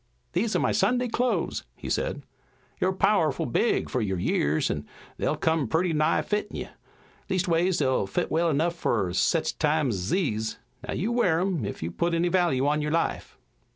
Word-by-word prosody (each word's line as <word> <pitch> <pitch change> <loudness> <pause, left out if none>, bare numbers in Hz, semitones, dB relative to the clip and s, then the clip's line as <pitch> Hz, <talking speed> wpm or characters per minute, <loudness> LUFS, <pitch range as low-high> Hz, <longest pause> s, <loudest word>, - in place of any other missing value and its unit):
"These 210 +5 0
are - - +3
my - - +1
Sunday 245 +5 +2
clothes," 235 -6 -1
he - - -9
said. - - -2 0.6
"You're 185 - +2
pow'ful 185 -6 +2
big 175 - +1
fur 130 - -1
your 95 -3 -1
years, 75 -3 +1
an' - - -4 0.3
they'll - - 0
come 160 -5 +1
purty 165 +7 +1
nigh 155 +1 +2
fittin' 210 0 -2
you. - - -5 0.6
Leastways, 180 -1 +1
they'll 130 -7 +1
fit 95 - -2
well 165 +1 +2
enough 160 +3 +1
fur 110 - 0
sech 160 - +1
times 150 -4 +2
ez 95 0 -3
these. 110 - -1 0.3
Now - - -2
you 210 +8 -1
wear 185 -9 +2
'em, 180 - -1
ef - - -6
you 85 - -3
put 170 - 0
any 170 +1 +1
value 170 -8 +2
on 150 +1 +2
your 150 - -1
life." 165 +1 -1
165 Hz, 185 wpm, -26 LUFS, 130-185 Hz, 0.6 s, are